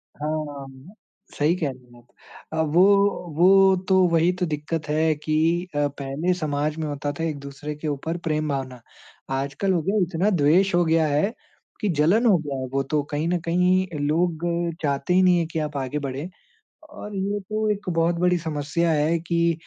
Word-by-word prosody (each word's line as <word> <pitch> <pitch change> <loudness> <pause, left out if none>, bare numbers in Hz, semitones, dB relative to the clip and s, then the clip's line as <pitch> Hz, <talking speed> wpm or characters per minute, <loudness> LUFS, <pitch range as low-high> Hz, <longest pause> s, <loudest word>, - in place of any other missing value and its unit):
हाँ। 145 0 -6 0.4
सही 150 +4 +2
कह 160 -5 -1
रही 130 -1 -15
हैं - - -16
आप। 120 - -32 0.5
अ, 160 - +1
वो 160 +3 +3 0.5
वो 190 +2 +6
तो 190 - +5
वही 165 +1 +3
तो 180 - +1
दिक्कत 155 0 -4
है 155 +1 +2
कि 155 +1 -2 0.4
अ, 145 0 +2
पहले 140 +5 -2
समाज 150 -2 -2
में 160 -1 -3
होता 145 0 -3
था - - -1
एक-दूसरे 145 -1 -5
के 150 +1 -6
ऊपर 150 +3 -3
प्रेम-भावना। 140 -5 -2 0.5
आज 140 +1 -2
कल 195 -1 +2
हो 170 - +1
गया 195 +6 0
इतना 180 +3 +1
द्वेष 180 +2 +3
हो 175 - +4
गया 160 -1 +2
है 150 +9 +1 0.5
कि 210 - 0
जलन 190 +11 +3
हो 210 -6 +5
गया 145 -4 -5
है 130 - -3
वो 135 0 +1
तो, 150 +2 0
कहीं 150 +2 -3
न 175 +1 0
कहीं 180 +2 +2
लोग 160 +3 0 0.4
चाहते 145 +3 0
ही 185 - +5
नहीं 180 -1 +5
है 170 - 0
कि 160 0 -4
आप 150 -2 -3
आगे 135 +2 -3
बढ़ें। 135 +6 -5 0.6
और 210 -8 -9
ये 200 +2 -1
तो 215 +2 -2
एक 205 -2 -3
बहुत 165 0 +1
बड़ी 180 +1 +3
समस्या 160 +1 -1
है 155 +2 +1
कि 170 0 +1
160 Hz, 190 wpm, -24 LUFS, 145-180 Hz, 0.6 s, वो